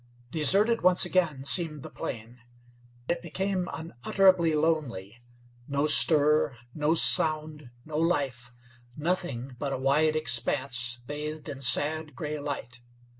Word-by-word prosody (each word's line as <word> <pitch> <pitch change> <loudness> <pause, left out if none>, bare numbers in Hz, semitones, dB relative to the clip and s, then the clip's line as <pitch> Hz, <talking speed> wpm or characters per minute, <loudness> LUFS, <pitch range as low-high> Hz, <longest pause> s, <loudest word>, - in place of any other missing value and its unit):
Deserted 200 - +2
once 180 0 +6
again 155 -8 -1
seemed 155 -1 +1
the - - -9
plain. 115 +1 -8 0.7
It 170 0 -2
became 185 +2 -3
unutterably 165 +4 0
lonely. 125 -10 -3 0.5
No 140 +1 -1
stir, 150 -3 +4 0.2
no 155 +1 0
sound, 155 -4 +2 0.2
no 155 0 -5
life; 135 -8 -2 0.5
nothing 145 -6 -3
but 140 -2 -4
a - - -3
wide 150 +4 +1
expanse 125 -2 0
bathed 150 +2 -6
in 140 -1 -8
sad, 150 +3 +2
gray 150 0 -6
light. 125 -5 -7
150 Hz, 120 wpm, -26 LUFS, 130-160 Hz, 0.7 s, once